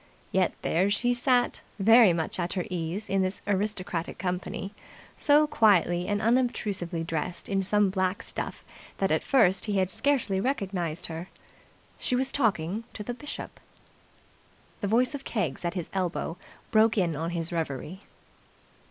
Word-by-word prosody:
Yet 185 -2 +2
there 185 +4 +2
she 240 +4 +2
sat, 245 0 +1 0.2
very 225 0 +7
much 165 +1 -2
at 175 0 -1
her 180 -3 -2
ease 180 +4 -3
in 195 0 +1
this 185 +1 -1
aristocratic 195 -4 -2
company, 180 +2 -3 0.4
so 295 0 +4
quietly 180 - +3
and 205 0 0
unobtrusively 210 -7 0
dressed 165 +2 -3
in 195 -1 +1
some 205 0 +2
black 190 +3 -1
stuff - - -6 0.3
that - - +1
at - - +2
first 210 -9 +3
he 205 -2 0
had 190 -1 +2
scarcely 230 -7 +1
recognized 190 - -2
her. 165 +3 -6 0.7
She 250 - 0
was 265 +1 +1
talking 210 - 0
to 210 - -6
the 245 - -4
Bishop... 295 +4 -7 1.2
The 205 - -2
voice 245 +6 +2
of 280 -1 -5
Keggs 180 - -2
at 170 +2 -2
his 175 -3 -3
elbow 180 -3 -2 0.4
broke 220 0 +4
in 175 -5 +1
on 165 +3 -2
his 170 -1 -3
reverie. 165 +2 -4
195 Hz, 150 wpm, -28 LUFS, 175-225 Hz, 1.2 s, very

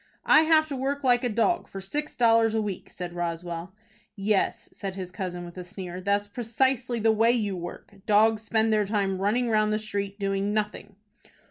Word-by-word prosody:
"I 310 - +7
have 315 -1 +4
to 280 - -3
work 275 +2 -2
like 245 -1 +3
a 245 - +1
dog 235 +11 +1
for 195 - -8
six 290 +11 -4
dollars 225 -2 +4
a 220 - +2
week," 200 -3 -5
said 175 -1 -7
Roswell. 170 +1 -4 0.4
"Yes," 200 0 0
said 195 -2 -5
his 185 -2 -6
cousin, 180 -2 -5
with 175 +1 -10
a - - -5
sneer, 180 -1 -7
"that's 200 +2 0
precisely 240 +2 0
the 225 0 +4
way 225 +1 +3
you 210 -5 0
work. 175 +2 -8
Dogs 215 +1 +4
spend 220 0 +1
their 210 -1 +2
time 195 -2 -1
running 230 +5 +1
round 215 -1 +2
the 215 - +2
street 200 -2 -4
doing 200 0 -1
nothing." 210 -1 -3
210 Hz, 195 wpm, -26 LUFS, 195-230 Hz, 0.4 s, I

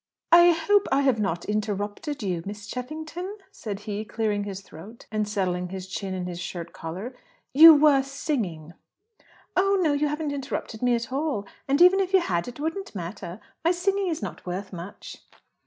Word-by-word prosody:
"I 345 +1 +9
hope 350 +5 +3
I 275 +1 +4
have 265 -5 +2
not 175 -5 -1
interrupted 210 +6 -3
you, 180 -4 -1
Miss 205 +2 -7
Cheffington?" 315 - -6
said 210 - -6
he, 210 0 -4
clearing 215 -2 -1
his 195 -1 -5
throat 200 +5 -13
and 215 -1 0
settling 180 -3 -1
his 190 0 -6
chin 190 0 -4
in 180 -1 -3
his 175 -1 -5
shirt 170 -1 -6
collar. 185 +10 -6 0.4
"You 320 +3 +11
were 290 -2 +5
singing." 225 - -3 0.8
"Oh 395 +1 +3
no; 320 -5 +3
you 295 +1 +1
haven't 300 0 -2
interrupted 270 -5 -4
me 245 -1 +3
at 235 +2 -4
all. 275 -7 -1 0.2
And, 275 +2 +2
even 370 +2 +7
if 380 0 -1
you 380 - +7
had, 175 - -1
it 245 +2 -8
wouldn't 325 - -4
matter. 180 +1 -6 0.2
My 330 - +4
singing 390 +2 +1
is 320 -9 -2
not 195 - -6
worth 190 +2 -5
much." 180 +4 -8
225 Hz, 180 wpm, -26 LUFS, 195-310 Hz, 0.8 s, You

